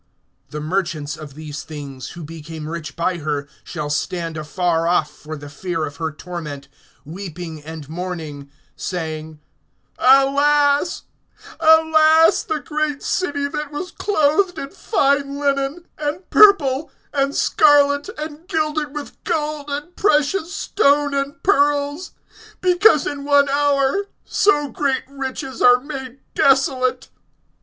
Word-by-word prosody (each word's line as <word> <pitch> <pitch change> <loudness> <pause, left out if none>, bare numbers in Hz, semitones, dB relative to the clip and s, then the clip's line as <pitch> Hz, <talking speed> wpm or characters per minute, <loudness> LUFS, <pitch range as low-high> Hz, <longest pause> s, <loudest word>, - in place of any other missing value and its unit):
(15)The 150 0 -5
merchants 155 -4 -2
of 150 -3 -11
these 150 -1 -7
things, 140 -4 -8
who 170 - -7
became 160 0 -8
rich 165 -1 -6
by 175 +2 0
her, 145 -2 -3 0.2
shall 150 -3 -5
stand 165 +2 -2
afar 165 +2 -1
off 170 -4 +2
for 155 +1 -9
the 145 0 -10
fear 165 +2 -3
of 145 -1 -9
her 160 0 -2
torment, 155 -4 -7 0.4
weeping 170 -1 -7
and 160 -2 -8
mourning, 160 -4 -6 0.3
(16)saying: 160 -3 -5 0.6
Alas, 285 +4 +4 0.6
alas, 320 0 +5
the 315 -1 -3
great 300 -2 -2
city, 285 -6 -1
that 300 +1 -5
was 365 +5 -5
clothed 355 0 +1
in 275 - -6
fine 280 -6 0
linen, 280 +3 -1
and 305 +5 -3
purple, 310 -9 +5 0.2
and 275 0 0
scarlet, 290 +1 +4
and 305 +2 -7
gilded 305 -2 -1
with 295 -1 -8
gold, 300 -2 -2
and 295 +5 -5
precious 325 -1 +1
stone, 290 -7 +2
and 275 0 -3
pearls; 290 -1 +1 0.5
(17)because 360 -4 +5
in 285 -1 -4
one 285 0 +4
hour 285 +5 +2 0.2
so 295 -8 +2
great 275 -1 -1
riches 265 -2 -6
are 245 0 +7
made 265 -1 -8
desolate. 265 -1 +2
275 Hz, 125 wpm, -20 LUFS, -, 0.6 s, are